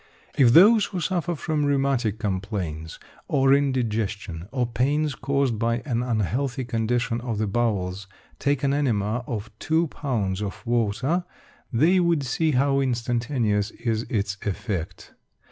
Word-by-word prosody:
If 125 -5 +5
those 210 - +7
who 185 - -4
suffer 175 0 -1
from 155 0 -1
rheumatic 135 -6 +1
complaints 95 -6 -3 0.3
or 135 0 +3
indigestion 110 -10 -1
or 125 -2 0
pains 140 +5 0
caused 135 -5 0
by 115 +1 0
an 120 -5 0
unhealthy 125 +3 -1
condition 115 +1 -1
of 120 -3 -3
the 110 - 0
bowels 100 -3 -1 0.3
take 140 0 0
an 140 0 +2
enema 120 -5 0
of 110 -2 -4
2 160 0 +1
lbs. 105 -11 -2
of 100 +4 -5
water, 120 - 0 0.5
they 160 +10 +4
would 170 -4 +2
see 155 +5 0
how 135 +1 +2
instantaneous 120 -4 0
is 115 -1 -3
its 100 -5 -1
effect. 100 -4 -4
120 Hz, 135 wpm, -25 LUFS, 105-140 Hz, 0.5 s, those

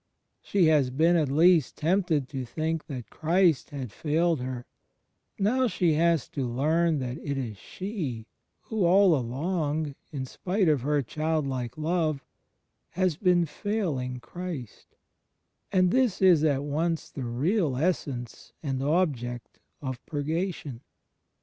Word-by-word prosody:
She 195 -4 +2
has 150 -5 +4
been 160 +7 +3
at 155 -5 +2
least 160 0 +4
tempted 165 -4 +1
to 135 -3 -4
think 155 +6 -3
that 130 -7 -7
Christ 170 -2 +2
had 135 -6 -6
failed 165 +3 +1
her; 125 -1 -5 0.7
now 250 +6 +2
she 180 -6 +1
has 165 -2 +2
to 140 - -3
learn 155 +6 +2
that 125 -2 -4
it 140 -1 -3
is 115 -6 -4
she 155 - -5 0.4
who, 220 -3 -2
all 185 0 +6
along, 150 +3 -1 0.2
in 135 -3 -4
spite 185 - -1
of 150 -5 +3
her 145 +1 +1
childlike 140 -3 -2
love, 155 -3 0 0.6
has 185 -3 0
been 180 0 +3
failing 150 - -2
Christ; 145 - -8 0.8
and 185 -1 +3
this 250 -6 +2
is 180 -5 +5
at 140 -3 +2
once 160 +3 -1
the 135 - -5
real 145 - 0
essence 135 -6 -2
and 135 -3 -2
object 135 -6 -1 0.2
of 130 -2 -5
Purgation. 155 -3 -3
155 Hz, 130 wpm, -27 LUFS, 130-175 Hz, 0.8 s, all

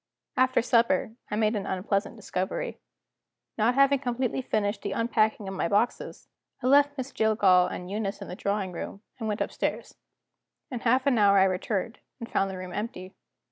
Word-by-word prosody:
After 255 -2 +3
supper, 230 -4 +2 0.2
I - - -2
made 215 +1 +2
an 200 - -3
unpleasant 195 +3 -1
discovery. 215 - -3 0.8
Not 230 +3 +2
having 275 0 +4
completely 255 0 -1
finished 205 -4 -1
the 200 - -3
unpacking 220 -2 +1
of 190 - -4
my 185 - -1
boxes, 210 +6 -1 0.4
I - - -2
left 285 +2 +4
Miss 265 +1 -4
Jillgall 200 -5 +4
and 180 - -6
Eunice 205 -1 -3
in - - -8
the 180 - -6
drawing 200 -1 -2
room, 195 +4 -7 0.2
and 220 - -3
went 210 0 -2
upstairs. - - -2 0.8
In 245 - -3
half 255 +3 +2
an 260 -5 +3
hour 200 -1 +5
I 190 - +6
returned, 195 +4 -1 0.2
and 230 - -6
found 195 -3 0
the 190 - -6
room 185 -1 -7
empty. 190 -4 -5
215 Hz, 180 wpm, -27 LUFS, 195-245 Hz, 0.8 s, I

